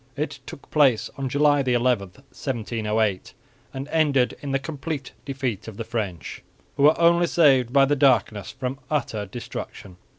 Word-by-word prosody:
It 145 -1 -3
took 135 - -11
place 135 -7 +3
on 135 -1 -3
July 145 +2 +3
11, 125 -3 +1 0.3
1708, 110 -6 -3 0.4
and 135 +1 -6
ended 145 -6 +2
in 140 - -4
the 135 - +2
complete 145 0 -5
defeat 130 -7 -3
of 110 -3 -9
the 115 - -3
French, 100 -8 -5 0.3
who 140 - -3
were 150 +3 +5
only 170 +1 +4
saved 135 -9 +4
by 135 0 +5
the 145 +2 +1
darkness 125 -7 +2
from 130 +1 -5
utter 115 -9 -2
destruction. 95 -3 -8
135 Hz, 155 wpm, -24 LUFS, 115-145 Hz, 0.4 s, were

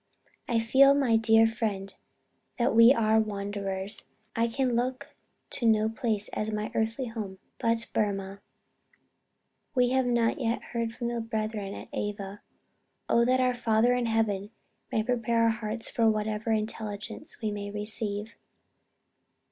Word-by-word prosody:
I 235 - +1
feel, 265 +5 +6
my 265 -5 +3
dear 225 0 +5
friend, 215 -4 -2 0.6
that 240 0 +2
we 230 +2 +9
are 220 -3 +3
wanderers. 200 -1 -3 0.3
I 230 0 +2
can 250 +1 0
look 255 +2 -2 0.4
to 235 - 0
no 220 -1 +4
place 220 -2 -1
as 215 +1 -3
my 210 0 -3
earthly 225 +4 -1
home, 210 -4 -6 0.2
but 230 0 +1
Burmah.... 195 -2 -1 1.4
We 250 -1 +4
have 260 -1 +2
not 235 0 +2
yet 235 -2 -1
heard 230 -1 -1
from 235 -1 -3
the 240 -1 -2
brethren 215 -3 -3
at - - -9
Ava. 205 -1 -4 0.7
Oh 235 - +4
that 255 +1 +3
our 255 0 +3
Father 235 0 +2
in 245 -1 0
Heaven 210 -3 0 0.4
may 220 - +1
prepare 230 -1 +1
our 230 - +5
hearts 225 0 -3
for 225 -1 +2
whatever 215 +1 -1
intelligence 215 -1 -3
we 215 -2 -2
may 205 0 -5
receive. 210 +1 -4
225 Hz, 145 wpm, -28 LUFS, 210-235 Hz, 1.4 s, we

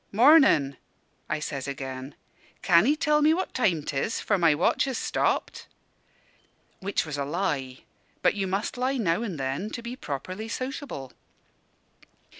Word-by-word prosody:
'Mornin'!' 225 - +5 0.5
I 155 - 0
says 140 -2 -4
again. 135 0 -6 0.5
'Can 175 +3 +5
'ee 295 - +4
tell 300 -1 +2
me 310 +2 +5
what 375 - -3
time 185 - +1
'tis? 145 +10 -2
for 205 - +1
my 165 -3 +4
watch 175 - +2
is 265 - -2
stopped' - - -1 1.1
which 200 -2 -1
was 145 -2 -5
a - - 0
lie; 140 -5 -2 0.4
but - - +4
you 195 -2 -2
must 195 +6 -2
lie 260 +2 0
now 180 -4 +1
and 195 -10 -4
then, 135 +10 -2
to 235 - -7
be 235 +1 -5
properly 185 - -5
sociable. 255 - -5
185 Hz, 150 wpm, -26 LUFS, -, 1.1 s, Mornin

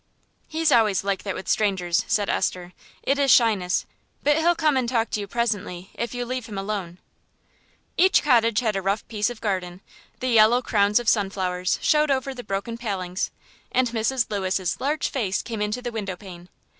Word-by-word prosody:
"He's 320 -1 +1
always 215 -7 +3
like 195 -1 -1
that 195 -2 -4
with - - -7
strangers," 185 -5 +1
said 205 -2 +1
Esther; 180 0 -1 0.3
"it 275 +1 +1
is 280 -1 +2
shyness; 210 -7 +3 0.4
but 295 0 +4
he'll 335 +2 +3
come 310 -3 +2
and 255 -3 0
talk 230 -3 0
to - - -1
you 200 - -5
presently, 205 -5 -2
if 235 +1 -4
you 245 0 -2
leave 255 -1 -4
him 205 -3 -7
alone." 195 -3 -4 1.0
Each 375 +2 +5
cottage 230 -5 +3
had 220 -4 0
a 195 - -1
rough 195 +3 -1
piece 210 0 0
of 240 -2 -9
garden, 185 -4 -2 0.4
the 255 - -1
yellow 230 +2 +5
crowns 205 -1 +3
of 240 - -7
sunflowers 190 -4 +1
showed 300 0 +3
over 270 0 0
the 250 -1 -8
broken 215 +4 -4
palings, 190 -4 -3 0.4
and 255 -1 +2
Mrs. 230 +2 0
Lewis's 190 -3 -1
large 295 +3 0
face 205 -8 -1
came 225 -3 -5
into 210 +4 -2
the 240 - -3
windowpane. 190 -4 -7
215 Hz, 180 wpm, -24 LUFS, 195-245 Hz, 1.0 s, Each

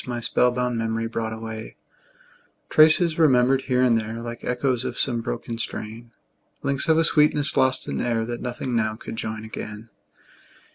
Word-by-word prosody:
My 120 -1 -3
spell 125 +1 +2
bound 125 -1 -1
memory 115 0 -2
brought 115 -1 -3
away; 110 0 -7 1.0
Traces, 160 +2 +5
remembered 130 -3 +4
here 125 -1 +2
and 120 -2 +4
there, 110 0 -3
Like 120 0 -7
echoes 125 0 0
of 125 -2 -5
some 120 -3 0
broken 115 -1 -5
strain; 115 +1 -5 0.5
Links 140 +4 -1
of 160 - +5
a 165 - +4
sweetness 150 -2 +4
lost 130 0 +2
in - - -2
air, 115 -2 0
That 120 0 -5
nothing 125 0 -4
now 110 -1 0
could 110 - -8
join 110 0 -4
again. 110 0 -8
120 Hz, 170 wpm, -24 LUFS, 115-130 Hz, 1.0 s, Traces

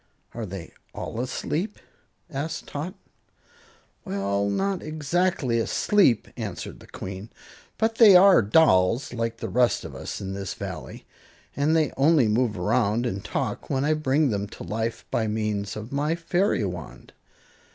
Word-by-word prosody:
"Are 115 -2 -5
they 95 -2 -8 0.2
all 115 - -5
asleep?" 160 - -3 0.5
asked 155 +4 -4
Tot. 160 +7 -5 1.1
"Well, 100 +1 -1
not 195 - -1
exactly 155 -4 0
asleep," 130 - +3
answered - - -6
the - - -15
Queen; 95 +3 -7 0.5
"but 225 0 0
they 210 -5 +9
are 190 -4 +8
dolls, 110 - +3
like 115 -1 -1
all - - -33
the - - -3
rest 125 -1 +2
of - - -8
us - - -6
in 95 0 -5
this 95 -1 -5
Valley, - - -7 0.5
and 150 +3 +2
they 155 -4 +2
only 140 -3 +4
move 110 0 +1
around 110 +4 +1
and 100 -5 -3
talk - - -3
when 135 +1 0
I 155 - +3
bring 150 -2 +2
them 100 -1 -2
to 110 - -10
life 115 +2 -3
by 110 - 0
means 105 -1 -2
of 110 +2 -7
my 150 +3 0
fairy 170 - +1
wand. 90 -4 -7
120 Hz, 150 wpm, -25 LUFS, 105-155 Hz, 1.1 s, they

